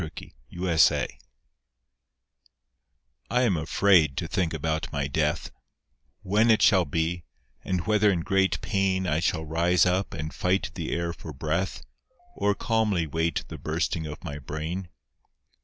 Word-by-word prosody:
NO 80 - -4 0.5
COWARD'S 85 -3 +2
SONG - - +4 2.2
I 125 +1 +2
am 105 -7 +2
afraid 80 -2 +3
to 85 - -2
think 90 -3 0
about 80 0 -2
my 70 -1 -1
death, 75 +1 -1 0.7
When 105 +4 +3
it 110 - +4
shall 95 -5 +5
be, 80 +3 -1 0.4
and 90 -2 -2
whether 105 -1 +3
in 90 -4 +1
great 95 +3 +1
pain 95 -3 0
I 80 -3 +1
shall 80 -1 0
rise 85 +3 +2
up 90 +1 0
and 75 0 -5
fight 95 +1 0
the 85 -2 -4
air 85 0 -1
for 80 -1 -9
breath 80 +7 -2 0.5
Or 100 0 +1
calmly 110 -8 +1
wait 80 +2 -1
the - - -8
bursting 80 -1 -2
of 75 - -8
my 75 0 -6
brain. 80 +6 -5
85 Hz, 145 wpm, -26 LUFS, 80-95 Hz, 2.2 s, shall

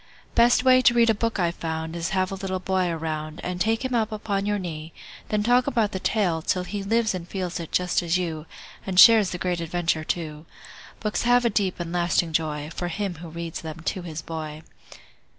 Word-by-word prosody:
Best 240 +1 +5
way 255 -1 +6
to 240 -1 +4
read 235 -1 +5
a - - +2
book 230 +2 -1
I've 170 -1 +1
found 160 -1 -4
Is 170 +1 -2
have 185 -2 0
a - - -3
little 190 -1 -3
boy 185 -1 0
around 155 -1 -4
And 180 0 -4
take 225 +4 +1
him 260 - -2
up 225 -2 +1
upon 205 -2 -2
your 205 0 +1
knee; 160 -4 -6 0.4
Then 210 -1 +1
talk 245 +2 +3
about 225 -4 +1
the 190 - -3
tale, 185 -5 0
till 180 +3 0
he 205 +2 -4
Lives 220 +2 +1
it - - -1
and 170 -1 -9
feels 185 -2 -3
it, 165 - -7
just 180 0 +1
as 170 0 +1
you, 160 -3 -4 0.4
And 185 -2 +1
shares 220 -4 +8
the 180 - -4
great 180 -1 -1
adventure, 165 -1 -1
too. 155 -1 -4 0.5
Books 210 -1 -1
have 245 0 +4
a 235 - +3
deep 195 -4 0
and 170 0 -4
lasting 175 -1 +1
joy 150 -1 -1
For 175 - -3
him 195 +2 -3
who 165 0 -9
reads 165 0 -6
them 160 0 -7
to 185 - -2
his 165 -2 -6
boy. 155 -1 -6
180 Hz, 220 wpm, -25 LUFS, 165-210 Hz, 0.5 s, shares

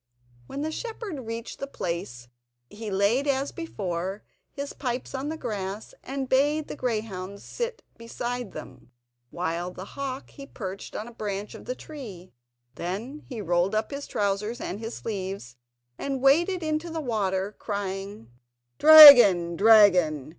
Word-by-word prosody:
When 280 - -5
the 315 - -2
shepherd 400 - -6
reached 230 0 -6
the 275 - -4
place 170 - -5 0.4
he 220 0 -7
laid, 205 +8 +1
as 275 0 0
before, 190 - -5 0.3
his 280 0 -6
pipes 250 -2 -4
on 270 +2 -3
the 320 - -4
grass 210 -5 -5
and 270 0 -4
bade 290 +4 +2
the - - -6
greyhounds 205 -6 -4
sit 475 -1 -5 0.2
beside 240 +1 -5
them, 125 -2 -11 0.4
while 175 +2 -3
the 180 +1 -9
hawk 270 +2 -6
he 275 -1 -11
perched 195 -6 -7
on 215 - -4
the 240 - -10
branch 205 -2 -5
of - - -11
the 250 - -4
tree. 215 - -10 0.4
Then 215 - -5
he 240 -5 -5
rolled 175 +2 +1
up 215 +4 -1
his 280 0 -6
trousers 210 +3 -2
and 200 - -5
his 225 +1 -6
sleeves, 190 - -6 0.4
and 275 -1 -3
waded 335 +7 +3
into 310 +2 -2
the 325 0 -4
water 205 -6 -2
crying: 195 - -5 0.5
"Dragon! 245 - +10
dragon! 185 -9 +5
220 Hz, 145 wpm, -26 LUFS, 190-275 Hz, 0.5 s, Dragon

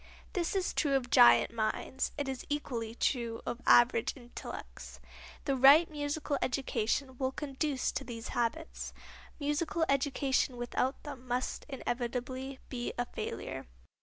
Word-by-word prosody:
This 355 0 -1
is 380 -2 0
true 285 -3 +2
of 250 -3 -1
giant 120 - +7
minds; 225 +4 -1
it 285 -2 -2
is 265 -2 -4
equally 235 -6 -3
true 235 -3 0
of 240 - -4
average 240 +1 +5
intellects. 240 -2 -9 0.5
The 275 - +1
right 280 +6 +7
musical 290 -1 -2
education 255 0 -1
will 260 -1 +1
conduce 275 -1 -1
to - - -3
these 235 -2 -7
habits. 245 +7 -2 0.5
Musical 320 +4 0
education 275 -2 +1
without 245 +2 -1
them 270 -4 -8
must 250 +1 -2
inevitably 255 +1 -3
be 240 -1 -4
a 245 - 0
failure. - - -5
265 Hz, 135 wpm, -32 LUFS, 240-285 Hz, 0.5 s, giant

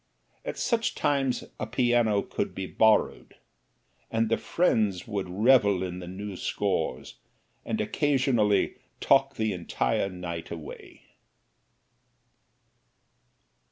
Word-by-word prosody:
At - - -5
such 230 -1 0
times 135 -3 0 0.2
a 110 - -3
piano 120 -3 +2
would - - -2
be 95 - -3
borrowed, 110 +3 +2 0.7
and 115 0 0
the 115 - +2
friends 110 - +1
would 100 -4 -3
revel 100 -1 +4
in 90 -1 -5
the 90 - -8
new 100 +2 -6
scores, 65 - -2 0.4
and - - -3
occasionally 130 -8 +1 0.2
talk - - +3
the 110 -2 0
entire 90 +2 -1
night 85 -3 -6
away. 80 -3 -9
105 Hz, 105 wpm, -27 LUFS, 95-120 Hz, 0.7 s, revel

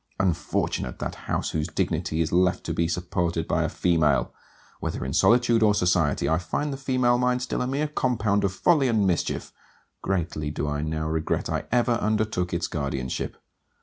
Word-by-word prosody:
Unfortunate 85 -8 -1
that - - -4 0.2
house - - -1
whose 75 -1 -1
dignity 80 +1 -1
is 80 - -1
left 90 +1 +2
to - - -3
be 85 - +1
supported 85 -1 -1
by - - +1
a - - 0
female! 80 -5 +1 0.5
Whether - - -3
in 65 - -3
solitude 120 - +4
or 105 -1 +4
society, 90 -7 +2
I 80 +3 +2
find 140 - -2
the - - -5
female 130 -2 +2
mind 125 0 +1
still 125 - -2
a 125 - -1
mere 140 +4 0
compound 110 -8 0
of 100 - +1
folly 140 - +3
and 110 -4 +2
mischief: 90 -4 -1 0.5
greatly 85 -5 -2
do 75 0 -3
I 75 0 -1
now 80 0 -2
regret 80 0 -1
I - - -2
ever 120 0 +2
undertook 105 -4 0
its 85 0 -1
guardianship. 70 -4 -3
90 Hz, 180 wpm, -25 LUFS, 80-120 Hz, 0.5 s, solitude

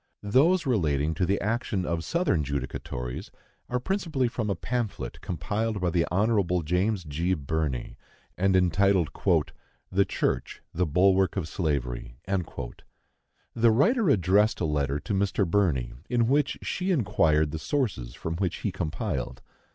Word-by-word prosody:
Those 155 - +3
relating 80 - +1
to 85 +3 0
the 100 - +1
action 105 -3 -1
of 85 -1 -1
Southern 170 - +1
judicatories 65 -3 -4 0.4
are 125 - 0
principally 165 -5 0
from 115 -2 -3
a 100 - +1
pamphlet 120 -3 -3
compiled 105 +6 -2
by 90 -2 0
the 85 -1 +1
Hon. 95 -3 +2
James 90 +4 +1
G. 85 +5 -1
Birney, 75 -4 -3 0.4
and 95 +1 +2
entitled 95 -1 +3 0.8
"The 100 +2 +4
Church - - -2
the 90 +1 0
Bulwark 95 +3 +3
of 85 -5 -1
Slavery." 60 -8 -2
The 95 - -4
writer 200 - +3
addressed 105 -1 +3
a 85 - 0
letter 75 -2 0
to 105 - -3
Mr. 100 0 +1
Birney, 80 -11 +1 0.2
in 120 -2 +2
which 140 +2 +2
she 185 +1 -2
inquired 80 - +2
the 80 - -4
sources 90 - -2
from 80 0 -4
which 90 -2 -1
he 100 - -1
compiled. 80 - -3
95 Hz, 140 wpm, -27 LUFS, 80-110 Hz, 0.8 s, The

